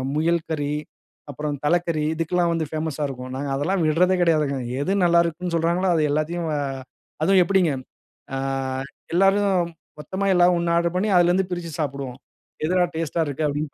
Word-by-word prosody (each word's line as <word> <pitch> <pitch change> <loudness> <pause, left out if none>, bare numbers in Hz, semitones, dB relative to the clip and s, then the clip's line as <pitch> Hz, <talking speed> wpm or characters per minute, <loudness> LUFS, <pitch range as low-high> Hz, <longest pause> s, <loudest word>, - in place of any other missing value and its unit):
முயல் 165 +2 +2
கறி, 145 -2 -1 0.6
அப்புறம் 150 +1 -3
தலைக்கறி 170 -1 +1
இதுக்கெல்லாம் 170 +2 +1
வந்து 165 -1 -1
பேமஸ்ஸா 155 -1 -2
இருக்கும். 130 -1 -7
நாங்க 140 +1 -3
அதெல்லாம் 175 +7 0
விடுறதே 180 +4 +3
கிடையாதுங்க. 155 -5 +2 0.2
எது 180 - -1
நல்லா 170 0 +5
இருக்குன்னு 170 +1 -3
சொல்லுறாங்களோ 170 +3 +1
அது 155 - +2
எல்லாத்தையும் 160 +3 -1
அ - - 0 0.6
அதுவும் 190 +3 +5
எப்டிங்க! 180 -2 +2 0.6
ஆ - - -1 0.8
எல்லாரும் 195 -1 +3 0.3
மொத்தமா 190 +6 -3
எல்லாம் 180 0 +5
ஒண்ணா 170 0 +1
ஆர்டர் 170 +1 0
பண்ணி, 200 +4 +1
அதிலருந்து 175 +2 +3
பிரிச்சு 175 -2 -4
சாப்பிடுவோம். 140 -4 -3 0.5
"எதுடா 180 +2 +3
டேஸ்ட்டா 165 0 -1
இருக்கு?" 145 +2 -2
அப்டின்னு 145 0 -3
170 Hz, 155 wpm, -23 LUFS, 150-180 Hz, 0.8 s, நல்லா